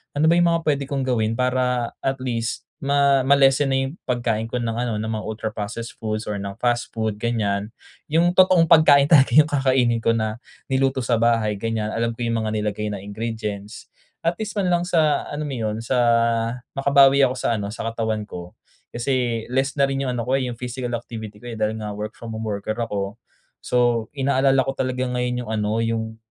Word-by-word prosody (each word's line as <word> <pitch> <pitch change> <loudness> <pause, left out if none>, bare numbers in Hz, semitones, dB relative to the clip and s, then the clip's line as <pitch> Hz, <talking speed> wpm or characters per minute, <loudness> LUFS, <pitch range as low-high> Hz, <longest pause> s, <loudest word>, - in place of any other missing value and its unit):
Ano 155 +2 +3
ba - - +5
yung 175 - +4
mga 165 0 +1
puwede 145 -2 +1
kong 140 -2 -2
gawin 115 -3 0
para 125 -1 0
at 135 0 -1
least 115 -2 -2 0.2
ma 140 -1 +2
ma-lessen 135 0 +5
na 135 - +1
yung 150 - -10
pagkain 120 -3 -1
ko 115 - -6
ng 120 -2 -1
ano 115 -1 -2
ng 110 +1 -3
mga 110 -1 -4
ultra 110 0 -3
processed 110 +2 -6
foods 110 0 -3
or 105 -1 -4
ng 100 0 -5
fast 120 +1 0
food 110 -2 -2
ganyan. 105 -3 -1 0.4
Yung 170 +3 +3
totoong 185 -2 +5
pagkain 145 -4 +7
talaga 145 -4 +5
yung 155 0 +6
kakainin 130 -4 +2
ko 115 0 +1
na 110 0 -2 0.3
niluto 135 -1 +1
sa 120 -2 +1
bahay 115 -3 +1
ganyan, 110 -1 -2
alam 115 0 -1
ko 120 - -5
yung 115 -1 0
mga 110 -1 -2
nilagay 105 0 -2
na 100 -2 -5
ingredients. 105 0 -6 0.3
At 170 +1 0
least 215 -1 -4
man 190 -3 +1
lang 175 0 +2
sa 155 -4 +2
alam 150 +1 -4
mo 140 -3 -4
'yun 110 -1 -2
sa 125 +2 0 0.8
makabawi 140 0 +5
ako 130 - -4
sa 115 -4 -1
ano, 100 - -3
sa - - -6
katawan 110 -2 -2
ko 90 -3 -9 0.4
kasi 120 -2 -1
less 135 +2 0
na 140 - +2
rin 135 0 -2
yung - - 0
ano 115 - -2
ko, 130 +3 +1
eh, 130 - -2
yung 120 - -5
physical 125 +1 -5
activity 110 -3 -7
ko, 120 - -6
eh, 110 - -7
dahil 110 0 0
nga 105 -1 -5
work 105 +2 -6
from 115 -1 -8
home 110 0 -4
worker 105 +1 -3
ako. 100 -1 -3 0.4
So 120 -2 +1
inaalala 135 0 +2
ko 135 - -2
talaga 130 -1 -1
ngayon 125 -1 -2
yung 110 - -6
ano, 110 +1 0
yung 110 -1 -2
120 Hz, 210 wpm, -22 LUFS, 110-135 Hz, 0.8 s, pagkain